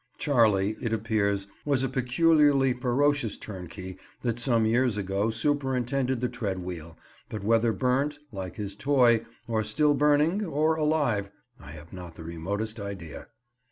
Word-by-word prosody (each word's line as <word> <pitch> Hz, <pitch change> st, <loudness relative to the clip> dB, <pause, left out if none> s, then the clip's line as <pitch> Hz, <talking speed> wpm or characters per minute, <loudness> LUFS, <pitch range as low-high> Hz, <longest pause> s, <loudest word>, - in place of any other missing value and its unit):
"Charley," 110 Hz, -7 st, +2 dB
it 115 Hz, -2 st, -1 dB
appears, 105 Hz, -3 st, 0 dB, 0.2 s
was 140 Hz, -3 st, +1 dB
a -, -, +1 dB
peculiarly 135 Hz, +1 st, +3 dB
ferocious 125 Hz, -1 st, +1 dB
turnkey 95 Hz, -1 st, -8 dB, 0.3 s
that 120 Hz, -1 st, -1 dB
some 120 Hz, -2 st, +2 dB
years 120 Hz, 0 st, +2 dB
ago 100 Hz, +2 st, -1 dB
superintended 130 Hz, 0 st, 0 dB
the 125 Hz, -, +1 dB
tread 110 Hz, -6 st, -3 dB
wheel, 85 Hz, -3 st, -7 dB, 0.3 s
but 105 Hz, -2 st, -6 dB
whether 115 Hz, +2 st, +3 dB
burnt, 135 Hz, +5 st, 0 dB
like 95 Hz, -3 st, -6 dB
his 100 Hz, -2 st, -5 dB
toy, 120 Hz, -2 st, +3 dB, 0.2 s
or 110 Hz, -2 st, 0 dB
still 145 Hz, +8 st, +2 dB
burning, 150 Hz, +7 st, +3 dB
or 155 Hz, -2 st, +1 dB
alive, 150 Hz, -10 st, 0 dB, 0.3 s
I 75 Hz, -, -11 dB
have 80 Hz, +3 st, -12 dB
not 90 Hz, -2 st, -9 dB
the 80 Hz, -, -9 dB
remotest 100 Hz, +7 st, -4 dB
idea. 100 Hz, -6 st, -7 dB
115 Hz, 145 wpm, -27 LUFS, 100-135 Hz, 0.3 s, peculiarly